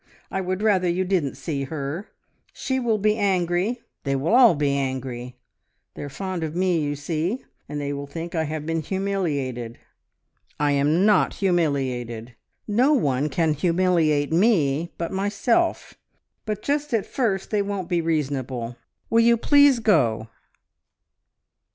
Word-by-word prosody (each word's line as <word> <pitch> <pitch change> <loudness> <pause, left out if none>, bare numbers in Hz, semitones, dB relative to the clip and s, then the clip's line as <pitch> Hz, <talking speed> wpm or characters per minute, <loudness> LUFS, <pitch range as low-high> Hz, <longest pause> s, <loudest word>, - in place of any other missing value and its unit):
I 190 - -1
would 185 +2 -3
rather 190 -5 +3
you 185 +2 0
didn't 180 -7 0
see 140 0 -3
her. 150 +7 -5 0.5
She 260 -1 -2
will 235 -3 +1
be 210 +1 +1
angry; 190 +4 0 0.2
they 140 -1 0
will 140 +10 0
all 240 -7 +7
be 145 -1 +1
angry. 130 -2 -4 0.6
They - - -9
are 145 - -5
fond 185 +4 -4
of 155 0 -4
me, 180 -2 +2
you 145 0 -2
see; 165 - -3 0.2
and 150 0 -4
they 145 0 -3
will 140 0 -5
think 165 +4 -6
I 160 -2 0
have 155 0 -4
been 165 0 -1
humiliated. 150 -11 -2 0.8
I 145 0 +2
am 150 +6 +2
not 210 -3 +3
humiliated! 130 - -1 0.3
No 245 +8 +3
one 145 - +1
can 160 +2 +1
humiliate 165 -2 +1
me 165 -5 +2
but 170 - -3
myself; 205 - 0 0.5
but 210 -1 -3
just 290 -2 0
at 210 - 0
first 210 -8 -1
they 210 -2 +2
won't 200 -3 -3
be 175 -1 +1
reasonable.... 130 -7 -2 0.3
Will 230 0 +5
you 235 0 +5
please 285 +2 +5
go?" 115 - +2
170 Hz, 150 wpm, -24 LUFS, 140-200 Hz, 0.8 s, all